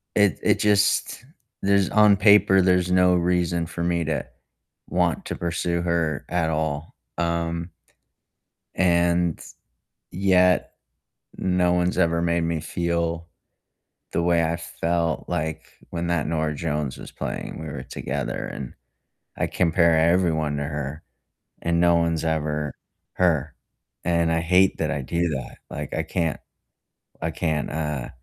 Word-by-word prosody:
It 105 -4 +3
it - - +2
just 105 +3 +2 0.4
there's 100 -1 +3
on 105 -1 +6
paper, 100 -1 +5
there's 90 -1 +2
no 90 0 +4
reason 85 -1 +1
for 85 +1 -5
me 85 -1 0
to 80 -1 -2 0.6
want - - 0
to - - -4
pursue 85 0 -1
her 85 -4 -1
at 90 -2 0
all, 80 -1 -2 0.2
um 85 0 -1 1.0
and, 85 -1 +2 0.8
yet 90 -2 +3 0.6
no 90 -1 +1
one's 90 +1 0
ever 85 -1 +2
made 85 0 +1
me 85 -1 -1
feel 85 +1 -2 0.8
the - - 0
way 85 -1 +3
I 80 +1 0
felt 85 -1 -2
like 80 0 -3 0.2
when 85 0 -3
that 85 -4 0
Norah 80 -1 -1
Jones 75 -2 -3
was - - -9
playing, - - -5
we 80 - -6
were 70 -4 -6
together 65 +1 -4
and 65 -3 -7 0.6
I - - +1
compare 85 -2 +3
everyone 80 -3 +2
to 70 - -2
her, 75 +1 -5 0.6
and 85 0 +1
no 85 -1 +5
one's 85 -1 0
ever 75 -2 -1 0.4
her, 80 -5 +1 0.5
and 85 -1 +2
I 80 - +1
hate 90 +3 +3
that 80 - -1
I 70 -3 -2
do 85 +5 -1
that, 65 -4 -5
like, 75 -1 -5
I - - 0
can't 80 -4 -1 0.9
I 80 - 0
can't, 80 -2 -1
uh, 75 -4 -3
85 Hz, 140 wpm, -24 LUFS, 80-90 Hz, 1.0 s, on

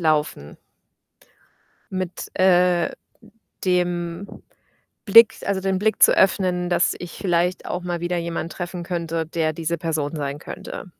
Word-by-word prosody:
laufen 150 - 0 1.4
mit, 185 -1 -4
äh, 180 -2 +4 0.8
dem 175 0 0 0.8
Blick 230 +2 +7
also 195 -1 0
den 190 -1 0
Blick 215 +2 0
zu - - +7
öffnen, 180 -2 +2
dass 175 - +2
ich 175 -1 -8
vielleicht 180 -1 0
auch 180 - -3
mal 175 -1 -3
wieder 175 +1 -1
jemanden 170 -1 -3
treffen 175 0 -5
könnte, 165 -2 -3
der 160 -1 -1
diese 165 +1 -2
Person 155 -2 -2
sein 140 0 -3
könnte. 190 +4 -8
175 Hz, 130 wpm, -22 LUFS, 165-185 Hz, 1.4 s, Blick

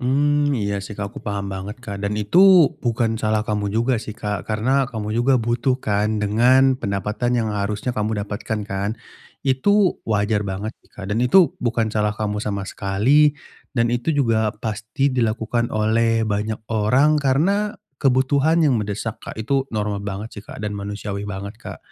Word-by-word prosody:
Hmm, 145 +3 +2
iya 100 -5 -1
sih, 105 - -8
Kak, 100 0 -4
aku 110 - -10
paham 100 -2 -3
banget 100 +5 -6
Kak, 100 -4 -6
dan 100 - -1
itu 180 - +6 0.2
bukan 115 -1 0
salah 110 -1 0
kamu 105 -1 -1
juga 120 +3 +1
sih, 110 -1 -6
Kak. 105 -3 -4
Karena 130 +6 +1
kamu 110 -5 -5
juga 125 +1 +3
butuh 120 +3 0
kan, 105 0 0
dengan 125 +6 +4
pendapatan 105 +2 -2
yang 115 -3 +1
harusnya 105 +3 -2
kamu 105 0 -1
dapatkan 105 +1 -4
kan. 100 +1 -2 0.5
Itu 180 +9 +2
wajar 105 -1 0
banget 100 +3 -4
sih - - -28
Kak, 95 -2 -8
dan 105 - -1
itu 180 +6 +5
bukan 115 -2 +1
salah 105 -1 0
kamu 105 0 -3
sama 100 -2 -3
sekali 130 +10 +3 0.4
dan 115 0 +3
itu 120 +5 -3
juga 115 -6 +2
pasti 110 +5 -1
dilakukan 115 0 0
oleh 115 +1 +2
banyak 110 +1 -2
orang 130 +9 +3
karena 185 +10 +1 0.2
kebutuhan 140 +5 +2
yang 135 -4 +3
mendesak, 105 +1 -3
Kak. - - -6
Itu 135 +5 0
normal 105 -2 -2
banget 100 +2 -5
sih, 105 - -7
Kak, - - -10
dan 105 -1 -3
manusiawi 100 0 -5
banget 100 +1 -6
Kak. - - -8
110 Hz, 170 wpm, -21 LUFS, 105-130 Hz, 0.5 s, itu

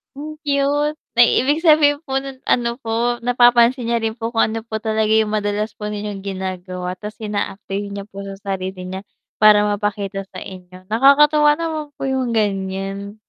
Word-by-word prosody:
Ang 305 +2 -7
cute, 290 +1 0 0.2
may 240 -1 +5
ibig 290 +6 +1
sabihin 300 -1 +4
po 270 -2 -1
no'n 270 -1 -9
ano 235 -1 +1
po 230 +2 0
napapansin 245 0 +4
niya 235 -1 0
rin 225 - 0
po 225 0 -5
kung - - +4
ano 225 - -3
po 225 0 -7
talaga 220 0 0
'yong 220 -1 +2
madalas 210 0 -1
po 210 - -7
ninyong 210 -1 -5
ginagawa 185 -1 -5
tas 210 +1 -7
ina-apply 205 -1 -3
niya 200 0 -6
po 195 - -9
sa 195 - -7
sarili 190 -2 -5
niya, 190 +2 -7 0.3
para 210 -1 +7
mapakita 205 -1 -2
sa 185 -1 -9
inyo 185 -1 -12
nakakatuwa 295 +5 +5
naman 315 -1 -3
po - - -16
'yong 260 -3 -1
ganyan. 195 0 -2
220 Hz, 170 wpm, -20 LUFS, 195-265 Hz, 0.3 s, para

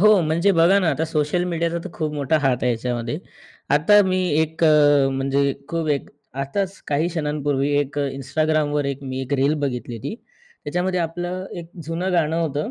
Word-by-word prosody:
हो, 210 -1 +6
म्हणजे 165 +5 +2
बघा 170 +4 +5
ना, 180 - +1
आता 155 +3 0
सोशल 155 +2 0
मीडियाचा 170 -1 -1
तर - - -6
खूप 155 -2 -3
मोठा 145 +2 +1
हात 135 -4 +2
आहे 125 - +2
याच्यामध्ये. 120 +4 -3 0.6
आता 205 +8 +6
मी 185 0 +1 0.2
एक 160 +1 0
अ, 145 -3 +5
म्हणजे 135 +1 +1 0.2
खूप 165 -2 -2
एक 140 - -1 0.3
आताच 190 +7 -3
काही 150 +3 +1
क्षणांपूर्वी 145 -4 -1
एक 145 0 -2
Instagramवर 145 +2 0
एक 140 0 -3
मी 130 0 -4
एक 130 +2 -5
रील 140 +3 +2
बघितली 125 -4 -3
होती. 115 - -5 0.5
त्याच्यामध्ये 180 +4 -1
आपलं 175 +3 -3
एक 170 0 -9
जुनं 175 +4 -2
गाणं 165 -2 +1
होतं. 150 -2 -2
150 Hz, 175 wpm, -22 LUFS, 140-170 Hz, 0.6 s, हो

